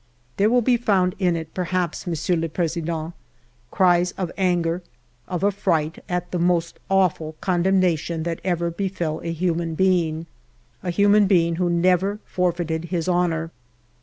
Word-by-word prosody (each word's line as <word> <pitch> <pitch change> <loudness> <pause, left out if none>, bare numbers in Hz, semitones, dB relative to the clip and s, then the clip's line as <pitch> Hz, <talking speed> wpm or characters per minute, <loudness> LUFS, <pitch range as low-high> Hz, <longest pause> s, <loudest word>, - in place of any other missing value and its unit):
" 125 0 -38
There 205 +2 +4
will 245 +1 +3
be 245 +1 +3
found 190 -6 +2
in 180 -3 +2
it, 160 -1 -6
perhaps. 180 -1 -2
Monsieur 170 +1 0
le 165 0 -1
President, 165 0 -2 0.6
cries 180 +1 +3
of 180 -3 -4
anger, 175 -2 0 0.5
of 180 -1 -3
affright, 165 -6 0
at 180 0 -2
the 180 - -1
most 170 -1 0
awful 180 -5 +1
condemnation 175 -3 +1
that 165 -1 -3
ever 170 -2 0
befell 170 -4 -3
a 165 - -3
human 165 -1 -1
being, 170 -3 +1 0.3
— - - -37
a 180 - -4
human 205 +3 +4
being 170 -4 +3
who 180 -1 +1
never 185 +3 +2
forfeited 170 -2 -1
his 170 -1 -2
honor. 170 -2 0
175 Hz, 155 wpm, -23 LUFS, 165-185 Hz, 0.6 s, There